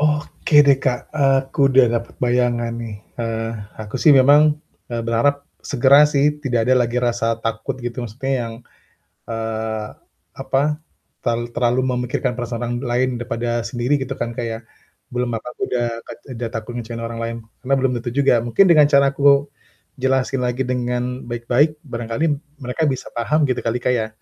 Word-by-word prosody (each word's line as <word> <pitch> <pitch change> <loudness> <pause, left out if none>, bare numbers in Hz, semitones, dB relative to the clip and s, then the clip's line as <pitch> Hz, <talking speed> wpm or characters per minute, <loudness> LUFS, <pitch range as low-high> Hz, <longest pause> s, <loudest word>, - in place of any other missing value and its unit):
Oke 150 0 +3
deh, 135 -1 +5
Kak, 125 -2 -2
aku 135 -2 +1
udah 135 -1 +6 0.2
dapet 115 - -14
bayangan 120 -1 +1
nih. 115 -2 -6 0.3
Eee, 115 0 -2 0.3
aku 105 -1 -9
sih 165 - +4
memang, 145 +2 +6 0.3
eee, 120 -1 -3
berharap 140 +5 +1 0.2
segera 140 +2 +5
sih, 140 -1 +1 0.2
tidak 120 -5 +1
ada 130 +2 +4
lagi 120 0 -2
rasa 120 -2 0
takut 120 +4 -2
gitu 120 +1 -4
maksudnya 125 +4 -4
yang, 115 -1 -4 0.8
eee, 110 -1 -3 0.5
apa, 135 - -1 0.6
terlal 120 -1 0
terlalu 120 +1 +2 0.2
memikirkan 125 0 -2
perasaan 120 -1 -4
orang 120 0 -2 0.2
lain 125 +2 +2
daripada 120 0 -2
sendiri 120 +4 0
gitu 130 - -9
kan, 120 0 -3
Kak, 120 - -3
ya, 115 -1 -4 0.5
belum 125 0 -1
apa-apa 115 - -6
aku - - -18
udah 120 -1 +1 0.2
kat - - -8 0.2
udah 115 0 -4
takut 110 +1 -5
ngecewain 115 -1 -5
orang 115 0 -6
lain, 115 0 -3 0.3
karena 135 - 0
belum 130 -1 +1
tentu 120 - -4
juga, 140 -2 +4
mungkin 120 - +4
dengan 150 -3 +7
cara 140 -1 +6
aku 140 0 +4 0.6
jelasin 130 -1 +1
lagi 125 +1 -1
dengan 125 -1 -1 0.3
baik-baik, 125 +6 +1
barangkali 120 +1 -3 0.4
mereka 125 +6 -2
bisa 130 - -5
paham 145 +7 +1
gitu 130 - 0
kali, 115 +2 -1
Kak, 125 - +2
ya? 110 -2 -1
125 Hz, 170 wpm, -20 LUFS, 115-135 Hz, 0.8 s, dengan